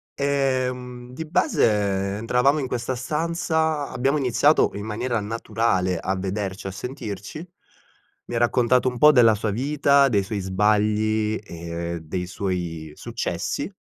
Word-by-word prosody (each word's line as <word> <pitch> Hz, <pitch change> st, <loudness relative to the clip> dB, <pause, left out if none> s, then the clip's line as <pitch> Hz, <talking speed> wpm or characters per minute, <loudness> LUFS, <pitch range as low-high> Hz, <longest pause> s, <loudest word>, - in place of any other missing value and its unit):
Ehm, 130 Hz, -3 st, -1 dB
di 160 Hz, -, -5 dB
base, 100 Hz, -, +1 dB
entravamo 125 Hz, +6 st, +2 dB
in 135 Hz, -, -2 dB
questa 125 Hz, +1 st, -2 dB
stanza 160 Hz, +2 st, -1 dB
abbiamo 135 Hz, +3 st, 0 dB
iniziato 140 Hz, +3 st, +3 dB
in 100 Hz, -, -5 dB
maniera 115 Hz, +2 st, -2 dB
naturale 105 Hz, -4 st, 0 dB
a 95 Hz, +1 st, -1 dB
vederci, 95 Hz, 0 st, -4 dB
a -, -, -4 dB
sentirci. 105 Hz, -, -7 dB, 0.8 s
Mi -, -, -6 dB
ha -, -, +1 dB
raccontato 125 Hz, +1 st, +3 dB
un 125 Hz, -, -7 dB
po' 150 Hz, +5 st, +7 dB
della 115 Hz, -6 st, +5 dB
sua 105 Hz, 0 st, -2 dB
vita, 140 Hz, +3 st, +3 dB
dei 100 Hz, -5 st, +2 dB
suoi 100 Hz, +2 st, -4 dB
sbagli 105 Hz, +2 st, +1 dB
e 85 Hz, -2 st, -5 dB
dei 90 Hz, +3 st, -4 dB
suoi 90 Hz, -4 st, -4 dB
successi. 120 Hz, -, -3 dB
115 Hz, 135 wpm, -23 LUFS, 100-130 Hz, 0.8 s, po